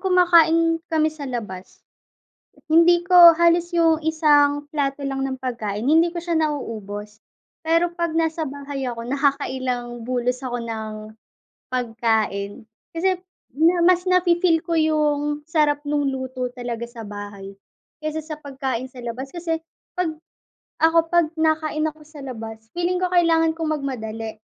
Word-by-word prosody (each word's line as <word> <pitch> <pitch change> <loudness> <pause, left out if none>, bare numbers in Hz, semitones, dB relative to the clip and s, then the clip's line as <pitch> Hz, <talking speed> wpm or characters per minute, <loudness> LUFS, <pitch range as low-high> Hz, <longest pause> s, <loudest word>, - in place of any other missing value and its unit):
kumakain 335 -3 +4
kami 315 -1 +1
sa 290 -3 -7
labas, 205 -7 -7 0.8
hindi 335 +2 +5
ko 350 -2 +10
halos 340 +1 +3
'yung 325 -2 +2
isang 290 -2 +3
plato 280 -1 -1
lang 270 0 -2
ng 265 -1 -3
pagkain, 230 -3 -3
hindi 325 +3 +4
ko 345 - -4
siya 340 0 -2
nauubos, 215 -9 -3 0.4
pero 335 +2 +1
'pag 340 -2 -1
nasa 325 0 0
bahay 280 -1 -6
ako, 230 0 -7
nakakailang 255 -3 -1
bulos 250 +1 -2
ako 245 -1 -3
ng 220 -1 -5 0.8
pagkain. 225 -4 -1 0.2
Kasi, 370 +3 +1 0.4
niya 335 +3 +3
mas 360 0 +3
na-fi-feel 350 -2 +3
ko 335 0 -2
'yung 300 -1 0
sarap 300 -3 +2
no'ng 290 -2 0
luto 260 -1 -4
talaga 240 -2 -5
sa 235 -3 -9
bahay, 205 -1 -8 0.5
kaysa 310 +1 -2
sa 310 0 -7
pagkain 270 -4 -4
sa 255 - -10
labas, 245 +3 -6
kasi 335 -2 -2 0.4
'pag 360 -3 0 0.7
ako, 330 0 +3
'pag 345 -2 +4
nakain 315 -1 0
ako 305 0 -19
sa 305 -2 -11
labas, 225 -3 -8
feeling 360 +1 -1
ko 365 - 0
kailangan 330 -2 +3
kong 320 -1 -2
magmadali 225 -6 -5
295 Hz, 140 wpm, -22 LUFS, 245-330 Hz, 0.8 s, ko